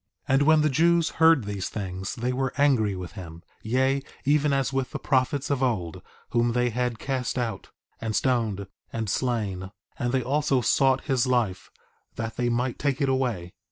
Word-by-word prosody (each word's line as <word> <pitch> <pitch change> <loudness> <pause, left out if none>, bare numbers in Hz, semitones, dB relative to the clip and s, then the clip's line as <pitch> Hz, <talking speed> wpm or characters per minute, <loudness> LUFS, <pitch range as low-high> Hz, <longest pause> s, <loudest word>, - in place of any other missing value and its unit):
1:20 - - +1
And 135 - +4
when 155 -1 +6
the 155 - +3
Jews 170 +3 +3
heard 160 -5 +6
these 100 -2 -4
things 95 -2 -5
they 125 +2 -1
were 135 0 -1
angry 125 -9 +3
with 90 -1 -6
him; 85 -4 -10 0.2
yea, 130 +4 +1 0.2
even 145 +1 +3
as 135 -1 0
with 135 -1 -1
the - - -4
prophets 135 +1 0
of 140 -2 0
old, 100 -11 -1 0.3
whom 120 0 +2
they 125 0 +1
had 125 0 -1
cast 130 0 -2
out, 115 -6 -3 0.3
and 110 -1 -3
stoned, 110 -6 0 0.3
and 115 -1 -3
slain; 105 -7 -1 0.3
and 120 0 0
they 130 -1 +1
also 140 +1 +1
sought 135 +2 +3
his 130 -4 +1
life, 120 -7 0 0.5
that 115 0 -4
they 120 0 0
might 120 +1 -1
take 140 -1 0
it 140 -2 +1
away. 120 -10 -1
125 Hz, 185 wpm, -26 LUFS, 110-135 Hz, 0.5 s, when